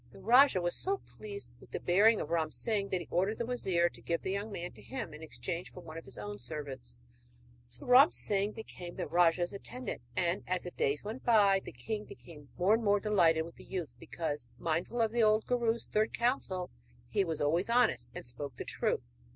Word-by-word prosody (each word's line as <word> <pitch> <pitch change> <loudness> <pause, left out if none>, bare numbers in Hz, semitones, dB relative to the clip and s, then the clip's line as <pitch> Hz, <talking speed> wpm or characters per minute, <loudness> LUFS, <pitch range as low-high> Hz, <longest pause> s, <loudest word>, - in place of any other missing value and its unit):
The - - -14
rajah 240 0 +6
was 175 0 0
so 390 +1 0
pleased 410 -1 -8
with - - -16
the - - -4
bearing 210 +5 +5
of - - -4
Ram 160 -2 +1
Singh 200 +3 -1
that 185 - 0
he 170 - -9
ordered 195 +5 +1
the 235 - -2
wazir 190 -8 +1
to - - -10
give 170 -1 -2
the 190 - -2
young 200 +2 -3
man 175 -2 -4
to - - -14
him 230 - -6
in 150 - -10
exchange 165 +2 -5
for 180 - -10
one 160 -2 -10
of 165 - -7
his - - -8
own 105 0 -6
servants. 130 -3 -5 0.7
So - - -8
Ram 255 +5 +8
Singh 205 +1 -1
became 180 -5 -8
the - - -3
rajah's 175 +1 +3
attendant; 240 - -6
and 175 +1 +1
as 185 -1 0
the 180 - -6
days 140 -2 0
went 220 +5 -6
by 205 -4 +5
the - - -8
king 215 -1 -4
became 150 -5 -13
more 185 +4 +4
and 225 +1 +2
more 205 -1 +4
delighted 175 -6 +3
with 165 - -12
the - - -11
youth 170 -10 -5
because, 145 -6 -4
mindful 170 +9 -1
of 220 - +1
the 235 0 +1
old 215 0 +4
guru's 235 -2 +1
third 215 +1 0
counsel, 220 -7 0 0.4
he - - +1
was 165 -4 -3
always 165 +8 +1
honest 225 - +3
and - - -6
spoke 125 +2 -4
the - - -6
truth. - - -2
185 Hz, 215 wpm, -32 LUFS, 165-220 Hz, 0.7 s, Ram